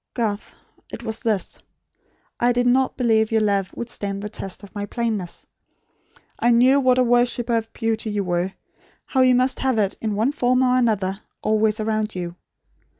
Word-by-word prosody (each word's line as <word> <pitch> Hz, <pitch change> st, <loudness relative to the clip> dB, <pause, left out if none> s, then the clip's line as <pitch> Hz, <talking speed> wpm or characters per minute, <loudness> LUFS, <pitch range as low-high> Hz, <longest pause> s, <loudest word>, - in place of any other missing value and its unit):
Garth 215 Hz, -4 st, -2 dB, 0.4 s
it -, -, -7 dB
was 220 Hz, -1 st, -2 dB
this. 215 Hz, -4 st, -2 dB, 0.8 s
I 245 Hz, +1 st, +3 dB
did 245 Hz, 0 st, +1 dB
not 255 Hz, +1 st, +2 dB
believe 220 Hz, -3 st, +2 dB
your 220 Hz, -1 st, +3 dB
love 200 Hz, -3 st, +1 dB
would 235 Hz, -, -4 dB
stand 200 Hz, -3 st, -4 dB
the 210 Hz, -, -4 dB
test 195 Hz, -1 st, -6 dB
of 200 Hz, -, -13 dB
my 205 Hz, -1 st, -4 dB
plainness. 220 Hz, -6 st, -3 dB, 0.9 s
I 240 Hz, -, +3 dB
knew 250 Hz, +4 st, +5 dB
what 255 Hz, -2 st, +3 dB
a 255 Hz, -, +4 dB
worshipper 240 Hz, 0 st, +2 dB
of 225 Hz, 0 st, -2 dB
beauty 225 Hz, -1 st, -2 dB
you 205 Hz, -1 st, -1 dB
were; 180 Hz, +1 st, -1 dB, 0.5 s
how 260 Hz, -, +1 dB
you 255 Hz, -1 st, +5 dB
must 255 Hz, +1 st, +1 dB
have 260 Hz, -3 st, +1 dB
it, 200 Hz, -3 st, +1 dB
in 215 Hz, -2 st, -1 dB
one 225 Hz, +6 st, +1 dB
form 255 Hz, -3 st, +2 dB
or 250 Hz, 0 st, +3 dB
another, 210 Hz, -5 st, +1 dB, 0.2 s
always 215 Hz, 0 st, +2 dB
around 215 Hz, -1 st, -1 dB
you. 175 Hz, -1 st, -4 dB
225 Hz, 180 wpm, -22 LUFS, 205-245 Hz, 0.9 s, knew